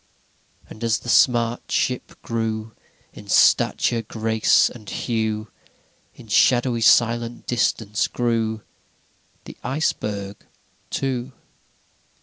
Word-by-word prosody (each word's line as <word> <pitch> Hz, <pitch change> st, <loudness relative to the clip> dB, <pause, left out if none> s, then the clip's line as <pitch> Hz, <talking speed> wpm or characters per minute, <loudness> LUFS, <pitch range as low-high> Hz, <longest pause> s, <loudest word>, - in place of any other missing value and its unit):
VIII -, -, -27 dB
And 110 Hz, -, -10 dB
as 115 Hz, -1 st, +2 dB
the 120 Hz, -, -9 dB
smart 120 Hz, -1 st, +2 dB
ship 125 Hz, -1 st, -2 dB
grew 110 Hz, -1 st, -3 dB, 0.4 s
In -, -, -13 dB
stature, 115 Hz, -1 st, +3 dB
grace, 110 Hz, 0 st, +2 dB
and 110 Hz, -4 st, -10 dB
hue, 110 Hz, -2 st, -2 dB, 0.7 s
In -, -, -14 dB
shadowy 120 Hz, +2 st, +3 dB
silent 120 Hz, +1 st, +2 dB
distance 110 Hz, -3 st, 0 dB
grew 115 Hz, -2 st, -1 dB, 0.8 s
the -, -, -10 dB
Iceberg 105 Hz, -8 st, -3 dB, 0.5 s
too. 130 Hz, -1 st, -3 dB
115 Hz, 100 wpm, -22 LUFS, 110-120 Hz, 0.8 s, stature